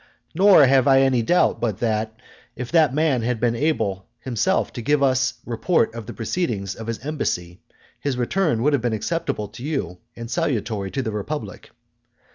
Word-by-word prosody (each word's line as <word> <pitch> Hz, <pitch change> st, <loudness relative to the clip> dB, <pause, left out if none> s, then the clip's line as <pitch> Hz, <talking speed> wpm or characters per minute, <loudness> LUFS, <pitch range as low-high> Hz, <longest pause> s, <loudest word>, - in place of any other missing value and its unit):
Nor 190 Hz, -6 st, +7 dB
have 135 Hz, 0 st, +4 dB
I 135 Hz, -1 st, +6 dB
any 130 Hz, -3 st, +3 dB
doubt, 175 Hz, +10 st, +2 dB
but 115 Hz, -5 st, -1 dB
that 110 Hz, -1 st, -2 dB, 0.4 s
if 125 Hz, -1 st, -6 dB
that 160 Hz, -4 st, +4 dB
man 145 Hz, -3 st, +1 dB
had 120 Hz, 0 st, -1 dB
been 120 Hz, 0 st, +1 dB
able 105 Hz, -, -1 dB
himself 130 Hz, -, 0 dB
to 120 Hz, -, -5 dB
give 145 Hz, +4 st, +2 dB
us 130 Hz, -1 st, +3 dB
his -, -, -28 dB
report 115 Hz, +3 st, +1 dB
of 115 Hz, -2 st, -8 dB
the 120 Hz, -, -6 dB
proceedings 110 Hz, -, -2 dB
of 115 Hz, -, -9 dB
his 115 Hz, -1 st, -2 dB
embassy, 90 Hz, -, -3 dB, 0.4 s
his 140 Hz, -3 st, -2 dB
return 125 Hz, -1 st, 0 dB
would 150 Hz, +2 st, +3 dB
have 140 Hz, -, +2 dB
been 120 Hz, -1 st, -1 dB
acceptable 110 Hz, -2 st, -2 dB
to 110 Hz, +4 st, -11 dB
you 135 Hz, -, -3 dB, 0.2 s
and 115 Hz, 0 st, -8 dB
salutary 110 Hz, -, -1 dB
to 135 Hz, +6 st, -3 dB
the 110 Hz, -, -3 dB
republic. 105 Hz, +2 st, -5 dB
120 Hz, 185 wpm, -22 LUFS, 110-145 Hz, 0.4 s, Nor